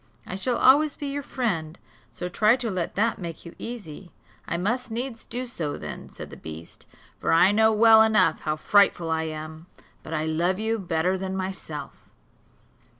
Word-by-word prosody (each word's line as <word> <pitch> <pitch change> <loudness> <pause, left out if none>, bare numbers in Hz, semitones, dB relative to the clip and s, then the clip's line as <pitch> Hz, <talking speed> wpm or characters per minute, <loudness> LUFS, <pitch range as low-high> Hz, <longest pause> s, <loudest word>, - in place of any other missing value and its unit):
I - - -7
shall 240 +6 0
always 290 +3 +5
be 290 - -6
your 285 +1 -3
friend; 190 - -2 0.3
so 180 - -5
try 215 +6 +4
to 245 -4 -3
let 180 -3 -3
that 225 +3 +1
make 170 -3 -7
you 170 - -9
easy." 195 -7 -8 0.4
"I 170 - -1
must 240 +8 -1
needs 230 +1 -4
do 250 +1 -5
so 165 -12 -4
then," - - -8
said - - -9
the - - -10
beast, 80 +1 -10 0.3
"for - - 0
I 180 +4 +6
know 220 +1 +4
well 220 0 +7
enough 215 -6 +4
how 155 -1 -1
frightful 175 -1 +3
I 160 0 0
am; 155 +1 -7 0.3
but 160 - -5
I 155 0 -1
love 170 +4 0
you 220 +1 -1
better 180 0 0
than 190 0 -3
myself. 160 -8 -6
190 Hz, 180 wpm, -25 LUFS, 160-225 Hz, 0.4 s, well